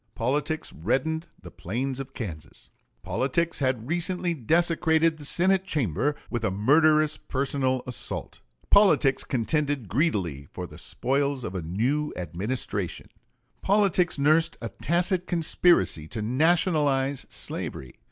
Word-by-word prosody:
Politics 145 Hz, +6 st, -1 dB
reddened 135 Hz, -, -1 dB, 0.2 s
the -, -, -10 dB
plains 130 Hz, +8 st, -4 dB
of 135 Hz, 0 st, -8 dB
Kansas; 85 Hz, -, -8 dB, 0.3 s
politics 130 Hz, -, -1 dB
had 130 Hz, -4 st, -1 dB
recently 175 Hz, +2 st, -1 dB
desecrated 160 Hz, +3 st, +2 dB
the 145 Hz, -, -6 dB
Senate 190 Hz, +5 st, +3 dB
chamber 145 Hz, -, -1 dB
with 120 Hz, -2 st, -4 dB
a 110 Hz, -, +2 dB
murderous 150 Hz, +9 st, +3 dB
personal 130 Hz, -1 st, -1 dB
assault; 125 Hz, -, -5 dB, 0.3 s
politics 185 Hz, -10 st, +5 dB
contended 140 Hz, 0 st, -1 dB
greedily 95 Hz, -, -1 dB
for 90 Hz, -, -6 dB
the -, -, -12 dB
spoils 140 Hz, 0 st, -1 dB
of 90 Hz, -, -5 dB
a 95 Hz, -, -3 dB
new 120 Hz, -, -1 dB
administration: 95 Hz, +2 st, -4 dB, 0.5 s
politics 195 Hz, -4 st, +2 dB
nursed 155 Hz, +4 st, +3 dB
a 115 Hz, -, -5 dB
tacit 180 Hz, -, +1 dB
conspiracy 165 Hz, -, +2 dB
to 110 Hz, +5 st, -4 dB
nationalize 145 Hz, -, +1 dB
slavery. 65 Hz, -, -6 dB
140 Hz, 120 wpm, -26 LUFS, 115-160 Hz, 0.5 s, politics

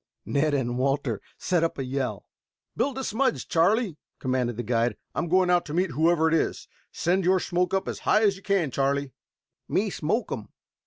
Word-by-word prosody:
Ned 145 Hz, +1 st, +1 dB
and 120 Hz, -2 st, -1 dB
Walter 135 Hz, -4 st, 0 dB, 0.2 s
set 175 Hz, -3 st, +1 dB
up 165 Hz, -, -1 dB
a 135 Hz, -, -2 dB
yell. 130 Hz, 0 st, -3 dB, 0.5 s
"Build 275 Hz, -2 st, 0 dB
a 265 Hz, -, -2 dB
smudge, 220 Hz, -, 0 dB
Charlie," 185 Hz, +1 st, +2 dB, 0.2 s
commanded 125 Hz, -3 st, -1 dB
the 120 Hz, -, -2 dB
guide. 115 Hz, -1 st, 0 dB, 0.2 s
"I -, -, -2 dB
am 170 Hz, -, -1 dB
going 180 Hz, +1 st, +3 dB
out 175 Hz, -1 st, +4 dB
to 150 Hz, -, -4 dB
meet 180 Hz, -1 st, +1 dB
whoever 160 Hz, +3 st, +3 dB
it 160 Hz, -, +1 dB
is. 165 Hz, -, 0 dB, 0.2 s
Send 185 Hz, +3 st, +1 dB
your 185 Hz, +2 st, +4 dB
smoke 180 Hz, 0 st, 0 dB
up 195 Hz, 0 st, 0 dB
as -, -, -4 dB
high 215 Hz, -, +3 dB
as 200 Hz, -2 st, +4 dB
you 195 Hz, -, -13 dB
can, 195 Hz, -8 st, +1 dB
Charlie." 140 Hz, +1 st, 0 dB, 0.6 s
"Me -, -, +1 dB
smoke -, -, -1 dB
um." -, -, -5 dB
160 Hz, 200 wpm, -26 LUFS, 135-185 Hz, 0.6 s, out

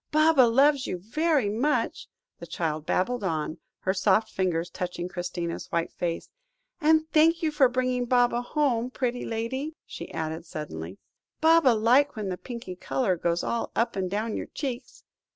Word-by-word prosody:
"Baba 310 Hz, -2 st, +5 dB
loves 275 Hz, +3 st, +4 dB
you -, -, -2 dB
very 275 Hz, -, +1 dB
much," 240 Hz, +9 st, 0 dB, 0.3 s
the -, -, -9 dB
child 155 Hz, -2 st, -3 dB
babbled 240 Hz, +4 st, 0 dB
on, 160 Hz, -2 st, -2 dB, 0.2 s
her 190 Hz, -, +1 dB
soft 210 Hz, +3 st, +2 dB
fingers 175 Hz, -2 st, -1 dB
touching 180 Hz, -1 st, -4 dB
Christina's 175 Hz, -2 st, -4 dB
white 170 Hz, 0 st, -1 dB
face, 170 Hz, -1 st, -3 dB, 0.5 s
"and 315 Hz, +1 st, +4 dB
thank 325 Hz, +2 st, +4 dB
you 315 Hz, -, +2 dB
for 280 Hz, -4 st, +4 dB
bringing 255 Hz, 0 st, 0 dB
Baba 245 Hz, -1 st, +3 dB
home. 245 Hz, -3 st, 0 dB
Pretty 250 Hz, -1 st, -2 dB
lady," 260 Hz, +7 st, -3 dB
she -, -, -8 dB
added 160 Hz, 0 st, -4 dB
suddenly, 95 Hz, -, -6 dB, 0.4 s
"Baba 325 Hz, -3 st, +5 dB
like 250 Hz, +6 st, +3 dB
when 210 Hz, -3 st, -3 dB
the 180 Hz, -, -3 dB
pinky 235 Hz, -7 st, -7 dB
colour 190 Hz, +1 st, 0 dB
goes 170 Hz, 0 st, -1 dB
all 235 Hz, -, -2 dB
up 230 Hz, -, +1 dB
and 190 Hz, -2 st, -1 dB
down 215 Hz, +3 st, -2 dB
your -, -, -4 dB
cheeks." 265 Hz, -3 st, -6 dB
230 Hz, 160 wpm, -27 LUFS, 180-270 Hz, 0.5 s, Baba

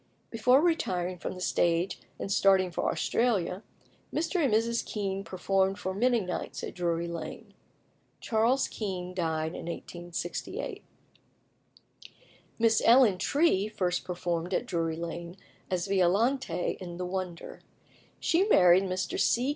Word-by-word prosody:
Before 250 Hz, +4 st, +4 dB
retiring 185 Hz, -, 0 dB
from -, -, -4 dB
the 185 Hz, -, -9 dB
stage 175 Hz, +1 st, +1 dB, 0.2 s
and 195 Hz, -, -4 dB
starting 190 Hz, -2 st, +4 dB
for -, -, -1 dB
Australia, 200 Hz, -6 st, 0 dB, 0.5 s
Mr. 335 Hz, +2 st, 0 dB
and 270 Hz, -, +2 dB
Mrs. 230 Hz, +2 st, +1 dB
Kean 195 Hz, -2 st, -3 dB
performed 190 Hz, +1 st, 0 dB
for 190 Hz, -2 st, -3 dB
many 240 Hz, +4 st, +2 dB
nights 180 Hz, -3 st, -5 dB
at -, -, -5 dB
Drury 170 Hz, -1 st, -1 dB
Lane. 165 Hz, -2 st, -7 dB, 0.7 s
Charles 235 Hz, +4 st, +2 dB
Kean 185 Hz, -4 st, -5 dB
died 160 Hz, -3 st, -1 dB
in -, -, -7 dB
1868. 175 Hz, 0 st, -5 dB, 1.7 s
Miss 225 Hz, -1 st, +3 dB
Ellen 230 Hz, -6 st, +6 dB
Tree 280 Hz, -, +2 dB
first 180 Hz, -4 st, -1 dB
performed 175 Hz, 0 st, -2 dB
at -, -, -1 dB
Drury 165 Hz, -6 st, -1 dB
Lane 170 Hz, +1 st, -6 dB, 0.3 s
as 180 Hz, -2 st, -1 dB
Violante 195 Hz, +1 st, +1 dB
in 175 Hz, -2 st, -7 dB
"The 180 Hz, -, -3 dB
Wonder." 180 Hz, -2 st, -5 dB, 0.6 s
She 345 Hz, +4 st, +2 dB
married 180 Hz, -, +6 dB
Mr. 185 Hz, 0 st, -2 dB
C. 250 Hz, +3 st, +2 dB
185 Hz, 130 wpm, -29 LUFS, 175-225 Hz, 1.7 s, Ellen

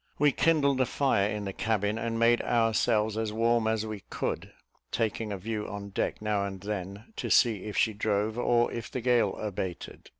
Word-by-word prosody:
We 145 Hz, 0 st, +4 dB
kindled 140 Hz, -4 st, +2 dB
a 130 Hz, -, +2 dB
fire 105 Hz, -8 st, +2 dB
in 105 Hz, -1 st, -3 dB
the 95 Hz, -, -4 dB
cabin, 105 Hz, 0 st, 0 dB
and 115 Hz, 0 st, -2 dB
made 115 Hz, +1 st, +4 dB
ourselves 110 Hz, -1 st, +2 dB
as 110 Hz, -1 st, -1 dB
warm 115 Hz, +1 st, +2 dB
as 110 Hz, -1 st, 0 dB
we 110 Hz, -1 st, -5 dB
could, -, -, -3 dB, 0.4 s
taking 110 Hz, -1 st, -1 dB
a 100 Hz, -, -3 dB
view 105 Hz, +2 st, -4 dB
on 100 Hz, 0 st, -6 dB
deck 100 Hz, -, -2 dB
now 105 Hz, -2 st, +1 dB
and 95 Hz, -1 st, -5 dB
then, 100 Hz, -, -6 dB
to -, -, -3 dB
see 110 Hz, -6 st, +3 dB
if 105 Hz, -, -5 dB
she 110 Hz, -, +3 dB
drove, 105 Hz, +1 st, 0 dB
or 120 Hz, -1 st, +2 dB
if 115 Hz, -, -5 dB
the 130 Hz, -, -4 dB
gale 120 Hz, -5 st, +2 dB
abated. 95 Hz, -4 st, -5 dB
110 Hz, 195 wpm, -29 LUFS, 105-115 Hz, 0.4 s, We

